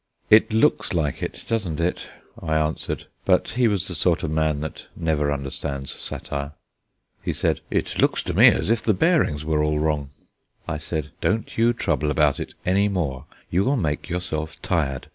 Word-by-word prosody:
"It 110 +1 +7
looks 110 +1 +2
like 75 -5 -1
it, - - -5
doesn't 100 -9 -1
it?" 85 +2 -1 0.3
I 80 -2 -1
answered. 80 0 -1 0.2
But - - +3
he 125 0 +2
was 100 -3 0
the 90 - -4
sort 85 +1 +1
of 80 - -1
man 80 -2 +1
that 80 - -6
never 75 -4 0
understands 70 -1 -4
satire. 70 0 -5 0.7
He - - -2
said: - - 0
"It - - -1
looks - - +2
to - - -3
me - - +8
as - - +3
if 115 - +2
the 110 - +2
bearings 95 - +2
were 75 -1 +1
all 75 0 +1
wrong." 75 -2 0 0.6
I 75 - -2
said: 75 -1 -4
"Don't 110 +2 0
you 115 +1 +4
trouble 80 -9 0
about 75 -2 +2
it - - -6
any 100 +3 +3
more; 80 -10 -2 0.3
you 90 +3 +3
will 135 +4 +2
make 75 -4 -2
yourself 80 -3 -3
tired. 70 -6 -1
80 Hz, 180 wpm, -23 LUFS, 75-95 Hz, 0.7 s, me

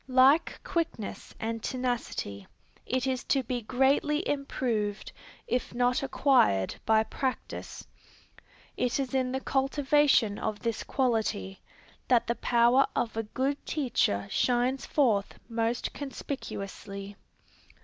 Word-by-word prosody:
Like 265 +4 +4
quickness 330 - -3
and 225 0 -3
tenacity, 245 - -3 0.4
it 255 0 0
is 260 -2 -1
to 270 -2 +2
be 245 -1 -2
greatly 275 - +2
improved, 235 -7 -2 0.3
if 250 -1 -2
not 245 0 +2
acquired 255 - +3
by 220 0 +5
practice. 260 +3 -4 0.9
It 245 +2 0
is 270 -2 -2
in 260 -1 +1
the 265 - -1
cultivation 270 -5 +2
of 215 -1 -2
this 230 -2 -2
quality, 220 -7 -1 0.5
that 245 -2 +4
the 235 - 0
power 240 +3 +4
of 230 - -1
a 225 - 0
good 265 +6 -2
teacher 240 - 0
shines 250 +2 +1
forth 225 -9 +1
most 230 0 -1
conspicuously. 200 -7 -6
250 Hz, 115 wpm, -29 LUFS, 225-270 Hz, 0.9 s, by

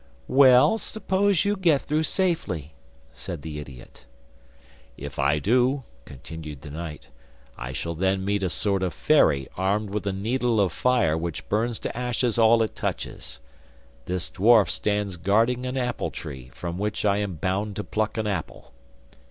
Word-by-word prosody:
'Well, 135 - +6
suppose 200 -3 +1
you 205 +1 +2
get 170 -7 +3
through 155 +1 0
safely?' 110 - -1 0.4
said 80 -4 -7
the 75 -2 -5
idiot. 65 -4 -12 0.9
'If - - -8
I 70 +2 +3
do,' 125 - +2 0.2
continued 75 +1 -9
the 75 - -8
knight, 80 0 -7 0.5
'I 60 +1 -6
shall 85 +5 -3
then 95 +3 0
meet 100 0 0
a 95 - 0
sort 100 +1 +1
of 90 -2 -2
fairy 70 - +3
armed 100 +2 0
with 105 0 -3
a - - +1
needle 115 +4 0
of 95 -4 +2
fire 120 -11 +2
which 80 -3 -4
burns 115 +2 0
to - - -4
ashes 125 -1 -1
all 115 0 +5
it 110 - -4
touches. - - -5 0.7
This 90 -1 -3
dwarf 110 +2 +5
stands 105 -3 -1
guarding 115 +8 +1
an 130 +1 -3
apple 125 -2 -1
tree, 65 -4 -8
from 85 +1 -5
which 105 +1 -2
I 100 -1 +3
am 100 -3 -2
bound 95 +6 -2
to 105 - -3
pluck 110 +1 -2
an 110 - -1
apple. 95 -6 -4
100 Hz, 160 wpm, -25 LUFS, 85-125 Hz, 0.9 s, Well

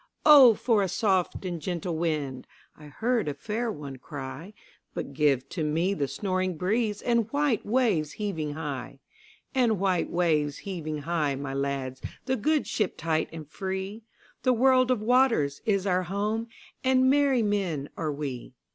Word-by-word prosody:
"O 275 -7 +9
for 225 -1 +2
a 195 - +1
soft 190 -1 0
and 175 -3 -4
gentle 175 0 -3
wind!"I 150 -2 -4
heard 225 - -1
a 145 - -2
fair 225 +2 -2
one 140 -7 -7
cry:But 140 +4 -9
give 140 -2 +2
to 170 - -3
me 165 +6 +1
the 145 -8 -1
snoring 185 0 -2
breezeAnd 220 +4 0
white 285 -5 +1
waves 210 - +1
heaving 160 -8 -3
high; 140 -4 -5 0.6
And 240 -6 +2
white 185 -3 +1
waves 155 -4 +1
heaving 155 -6 -4
high, 155 -3 0
my 135 0 -5
lads, 135 -1 -3 0.2
The 260 0 +1
good 300 +6 +1
ship 210 -4 -1
tight 160 -1 0
and 160 -2 -8
free—The 195 - -4
world 255 +1 +4
of 245 -5 +1
waters 230 - +3
is 200 -2 +2
our 185 -1 +2
home, 210 +5 -2 0.4
And 260 0 +4
merry 275 -3 +3
men 190 -9 -1
are 155 -2 -2
we. 140 -4 -5
185 Hz, 145 wpm, -27 LUFS, 150-225 Hz, 0.6 s, O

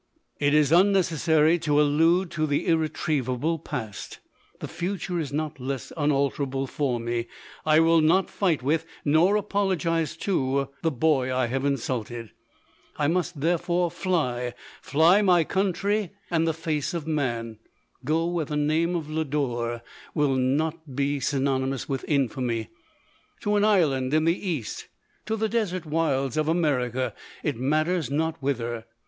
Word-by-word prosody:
" - - -46
It 145 - +3
is 150 -1 +4
unnecessary 170 -3 +4
to 150 -2 +2
allude 165 +5 +3
to 155 -2 -1
the 145 -1 0
irretrievable 155 -2 0
past. 110 -8 -6 0.4
The - - -5
future 175 +1 -3
is 145 -4 -3
not 150 -1 -3
less 130 -1 -4
unalterable 140 -2 0
for 130 -3 -1
me. 120 0 -2 0.4
I 155 +1 +6
will 165 0 +5
not 175 +5 +4
fiidn 170 -9 0
with, 155 +4 +1 0.2
nor 160 +7 +4
apologize 185 -6 0
to, 140 -7 0
the 165 - +2
boy 135 -2 +1
I 130 0 +1
have 130 +3 -2
insulted; 120 -4 -2 0.7
I 145 0 +1
must 175 -3 -1
therefore 175 +1 +1
fly 125 -10 -1
— - - -19
fly 165 +7 +5
my 180 -4 +4
country 200 +2 0 0.2
and 165 -1 +2
the - - +3
152 160 - -10
LODORE.. 155 - +2
face - - -3
of 165 -3 -3
man; 120 -8 -2 0.4
go 160 +5 +1
where 170 -2 -1
the 150 +1 -3
name 160 +4 +1
of 160 -3 -3
Lodore 130 -7 -2 0.3
will 145 -4 +2
not 145 +3 -1
be 140 +1 0
synonymous 135 -1 -1
with 135 -2 -3
infamy 125 -5 0 0.3
— - - -36
to 205 0 +1
an 205 - +3
island 150 -10 +2
in 155 0 +3
the 175 +3 0
east 145 -11 -4 0.2
— - - -40
to 220 - 0
the 220 0 0
desert 200 -6 -1
wilds 150 -4 0
of 155 0 +1
Ame 165 0 +2
rica 125 -4 0 0.2
— - - -20
it - - 0
matters 155 +4 0
not 160 +3 -1
whither. 120 -4 -2
150 Hz, 160 wpm, -26 LUFS, 135-170 Hz, 0.7 s, I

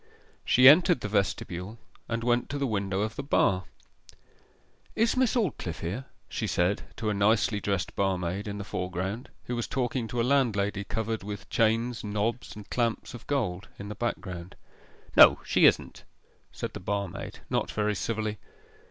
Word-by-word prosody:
She 125 +1 +6
entered 160 0 +7
the - - -2
vestibule, 100 0 -2 0.3
and 115 0 -2
went 120 0 +1
to 145 - -3
the 140 - 0
window 100 -4 -1
of 110 +1 -2
the - - -3
bar. 95 - +2 1.3
'Is 225 +1 +2
Miss 255 -2 +2
Aldclyffe 180 - -1
here?' 100 +11 -4 0.2
she - - -3
said 90 +3 +1
to 110 -2 -1
a - - 0
nicely 105 +1 +2
dressed 100 -2 -2
barmaid 95 0 -1
in 100 0 -4
the 100 - -4
foreground, 95 +5 -4
who 120 - -4
was 120 - -2
talking 125 -2 -1
to 120 +2 -3
a - - +3
landlady 105 -7 +1
covered 110 +1 -2
with 100 0 -7
chains, 115 +2 +1
knobs, 105 +3 -2
and 105 -1 -10
clamps 115 -3 -1
of 120 - -10
gold, 100 -10 -1
in 100 +1 -7
the - - -4
background. 95 -6 -4 0.6
'No, - - +9
she - - +5
isn't,' - - 0 0.5
said - - -5
the - - -6
barmaid, 100 -1 -4
not - - 0
very 105 0 0
civilly. 110 0 -2
105 Hz, 165 wpm, -28 LUFS, 100-120 Hz, 1.3 s, No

